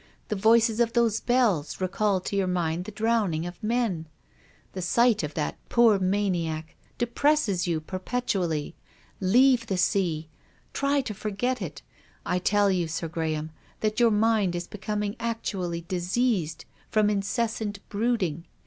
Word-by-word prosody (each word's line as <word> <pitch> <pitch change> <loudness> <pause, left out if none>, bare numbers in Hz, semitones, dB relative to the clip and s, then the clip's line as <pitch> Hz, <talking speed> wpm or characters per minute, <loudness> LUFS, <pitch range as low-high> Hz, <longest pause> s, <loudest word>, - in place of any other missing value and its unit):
The 215 - 0
voices 225 +2 +4
of 235 -1 +2
those 230 -2 +2
bells 230 - +1
recall 190 +1 +1
to 200 - -4
your 195 -2 +1
mind 175 -1 -1
the 215 - -7
drowning 210 -7 0
of 175 0 -8
men. 215 -8 -1 0.7
The 185 - -4
sight 235 +5 +3
of 150 -2 -5
that 150 - -2
poor 230 -4 +5
maniac 180 -5 -1 0.2
depresses 240 - +1
you 165 -2 0
perpetually. 185 -3 -2 0.5
Leave 235 +5 +4
the 190 - -1
sea. 180 -4 +1 0.5
Try 280 0 +1
to 220 - -5
forget 215 +5 -2
it. - - -6 0.4
I 180 - 0
tell 205 +2 +3
you. 180 -3 0
Sir 165 +1 -3
Graham, 160 -1 -3 0.3
that 215 +1 0
your 235 -1 +6
mind 210 -4 +2
is 175 0 -3
becoming 210 +1 -3
actually 195 -7 -3
diseased 180 -1 -1 0.2
from 215 -1 +3
incessant 210 +1 -1
brooding. 200 -7 -1
200 Hz, 140 wpm, -26 LUFS, 175-230 Hz, 0.7 s, your